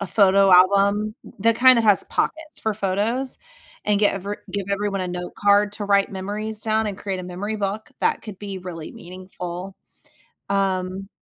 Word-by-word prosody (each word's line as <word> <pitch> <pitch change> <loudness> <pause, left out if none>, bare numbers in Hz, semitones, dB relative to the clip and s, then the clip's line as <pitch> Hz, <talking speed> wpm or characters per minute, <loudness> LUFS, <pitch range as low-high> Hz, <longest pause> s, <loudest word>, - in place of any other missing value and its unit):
a 200 - -3
photo 195 0 +4
album, 200 +3 +4 0.3
the 230 +2 +4
kind 255 +1 +7
that - - +2
has 205 -2 +5
pockets 315 0 -3
for 220 -1 -1
photos, 215 +7 -1 0.5
and 210 -1 +2
get 205 - +3
every 200 +2 -4
give 200 -2 -3
everyone 200 -1 -1
a 185 - -3
note 180 0 -5
card 205 0 +3
to 205 0 -4
write 200 0 +2
memories 210 +3 -4
down 220 0 +1
and 200 -2 -4
create 195 -2 -3
a - - -7
memory 200 +5 -4
book, 205 +1 -3
that - - +1
could 210 -4 -9
be 200 -2 -6
really 175 -3 -8
meaningful, 185 +1 -8 0.8
um 190 0 -1
200 Hz, 175 wpm, -23 LUFS, 190-210 Hz, 0.8 s, kind